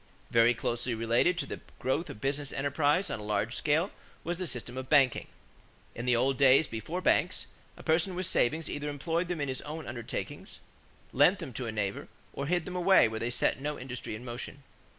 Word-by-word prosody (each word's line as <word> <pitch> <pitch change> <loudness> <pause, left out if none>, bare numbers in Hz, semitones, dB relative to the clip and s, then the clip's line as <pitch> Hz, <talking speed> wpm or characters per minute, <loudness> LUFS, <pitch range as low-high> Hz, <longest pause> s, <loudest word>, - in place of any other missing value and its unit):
= - - -31
Very 115 +1 +5
closely 120 +1 -1
related 115 +10 +2
to - - -1
the - - -6 0.2
growth 135 +6 -1
of 140 - -8
business 140 +2 -1
enterprise 145 +6 +1
on - - -3
a - - -7
large 105 +2 -1
scale 160 +6 +1 0.3
was 175 +1 -3
the 185 - -2
system 125 -3 -3
of 130 0 -6
banking. 135 -5 +4 0.7
In 120 - -5
the 125 - +4
old 130 +2 +2
days 135 +2 +6
before 150 +10 -4
banks, 180 0 +2 0.3
a - - -11
person 165 +3 +2
with 185 +1 -1
savings 160 +2 +1
either 145 0 -3
employed 165 +5 -1
them 175 -2 -3
in 145 - -1
his 130 -1 -3
own 155 +2 -6
undertakings, 120 -1 -6 0.5
lent - - +5
them 130 - -7
to 120 +1 -4
a - - -2
neighbor, 100 -2 -3 0.3
or 140 - -3
hid 175 0 +1
them 180 - -6
away 180 -5 +6
where 110 0 -4
they 115 - -1
set 120 +2 0
no 150 +1 -2
industry 125 -3 -5
in 120 +4 -9
motion. 125 +3 -7
135 Hz, 210 wpm, -30 LUFS, 120-160 Hz, 0.7 s, days